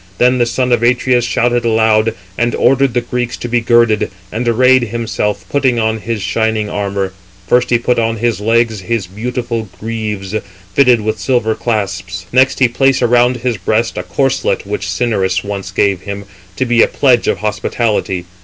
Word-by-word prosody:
Then 125 Hz, +1 st, +3 dB
the 120 Hz, -, +2 dB
son 125 Hz, +1 st, -1 dB
of 120 Hz, -2 st, +3 dB
Atreus 125 Hz, +1 st, +2 dB
shouted 120 Hz, 0 st, +1 dB
aloud, 110 Hz, -1 st, +2 dB, 0.2 s
and 120 Hz, +2 st, 0 dB
ordered 135 Hz, -1 st, +2 dB
the 120 Hz, -, +2 dB
Greeks 120 Hz, 0 st, -3 dB
to -, -, -5 dB
be 120 Hz, 0 st, +1 dB
girded; 115 Hz, -2 st, +3 dB, 0.2 s
and 120 Hz, +2 st, -3 dB
arrayed 125 Hz, +2 st, +4 dB
himself, 110 Hz, -2 st, -3 dB
putting 135 Hz, -4 st, +1 dB
on 110 Hz, -1 st, 0 dB
his 110 Hz, -2 st, -4 dB
shining 110 Hz, +2 st, -1 dB
armour. 100 Hz, -2 st, -2 dB, 0.3 s
First 125 Hz, +6 st, +2 dB
he 120 Hz, -, +4 dB
put 120 Hz, +1 st, 0 dB
upon 115 Hz, 0 st, 0 dB
his 115 Hz, -1 st, -1 dB
legs 115 Hz, 0 st, +1 dB
his 105 Hz, +2 st, -2 dB
beautiful 115 Hz, +2 st, -4 dB
greaves, 105 Hz, -3 st, -4 dB, 0.4 s
fitted 125 Hz, -5 st, +4 dB
with 110 Hz, 0 st, -2 dB
silver 110 Hz, +2 st, +1 dB
clasps; 95 Hz, -5 st, -3 dB
next 130 Hz, +1 st, +3 dB
he 130 Hz, -, +4 dB
placed 135 Hz, +2 st, +1 dB
around 120 Hz, +1 st, +3 dB
his 120 Hz, -2 st, -2 dB
breast 110 Hz, +5 st, 0 dB
a -, -, -2 dB
corslet 135 Hz, -2 st, -1 dB
which -, -, -4 dB
Cinyras 95 Hz, -6 st, 0 dB
once 100 Hz, -2 st, -5 dB
gave 95 Hz, -1 st, +1 dB
him, 100 Hz, 0 st, -6 dB, 0.3 s
to 130 Hz, -, 0 dB
be 120 Hz, -2 st, +3 dB
a -, -, +5 dB
pledge 125 Hz, -4 st, +2 dB
of -, -, +1 dB
hospitality. 105 Hz, -3 st, -1 dB
115 Hz, 175 wpm, -15 LUFS, 105-120 Hz, 0.4 s, a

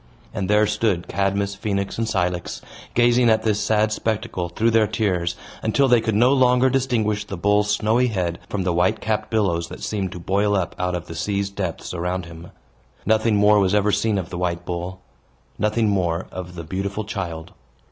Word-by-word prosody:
And 100 Hz, -4 st, -3 dB
there 105 Hz, +1 st, +4 dB
stood 105 Hz, -4 st, 0 dB
Cadmus, 100 Hz, 0 st, 0 dB
Phoenix, 100 Hz, 0 st, -3 dB
and 115 Hz, -, 0 dB
Cilix, 90 Hz, -4 st, -2 dB, 0.3 s
gazing 120 Hz, 0 st, +4 dB
at 110 Hz, 0 st, +3 dB
this 105 Hz, -2 st, +1 dB
sad 110 Hz, 0 st, +2 dB
spectacle, 105 Hz, -5 st, -2 dB
through 115 Hz, +7 st, +1 dB
their 110 Hz, -1 st, +4 dB
tears, 90 Hz, -5 st, -1 dB, 0.3 s
until 135 Hz, +5 st, +2 dB
they 120 Hz, -2 st, +5 dB
could 110 Hz, -2 st, -1 dB
no 125 Hz, +5 st, +5 dB
longer 130 Hz, -1 st, +4 dB
distinguish 115 Hz, -6 st, 0 dB
the 100 Hz, -1 st, -7 dB
bull's 105 Hz, +3 st, +2 dB
snowy 110 Hz, +4 st, +2 dB
head 90 Hz, -6 st, -2 dB
from 100 Hz, -2 st, -2 dB
the 90 Hz, -1 st, 0 dB
white 90 Hz, +6 st, +2 dB
capped 110 Hz, -1 st, -2 dB
billows 95 Hz, -7 st, 0 dB
that -, -, -10 dB
seemed 100 Hz, -4 st, -2 dB
to 90 Hz, -, -7 dB
boil 100 Hz, +4 st, +1 dB
up 90 Hz, -3 st, -1 dB
out 90 Hz, 0 st, 0 dB
of 90 Hz, 0 st, -5 dB
the 85 Hz, -, -8 dB
sea's 100 Hz, +3 st, -2 dB
depths 95 Hz, -5 st, -4 dB
around 90 Hz, +1 st, -2 dB
him. 85 Hz, +1 st, -11 dB, 0.6 s
Nothing 110 Hz, +1 st, +3 dB
more 105 Hz, +1 st, +5 dB
was 95 Hz, 0 st, +2 dB
ever 105 Hz, 0 st, +3 dB
seen 110 Hz, 0 st, +1 dB
of 90 Hz, -4 st, -4 dB
the 85 Hz, -, -4 dB
white 90 Hz, -1 st, -2 dB
bull 90 Hz, +1 st, -5 dB, 0.6 s
nothing 105 Hz, +1 st, +1 dB
more 90 Hz, -3 st, 0 dB
of 90 Hz, -1 st, -7 dB
the 85 Hz, -, -6 dB
beautiful 100 Hz, +5 st, -3 dB
child. 90 Hz, -6 st, -5 dB
100 Hz, 190 wpm, -22 LUFS, 90-110 Hz, 0.6 s, they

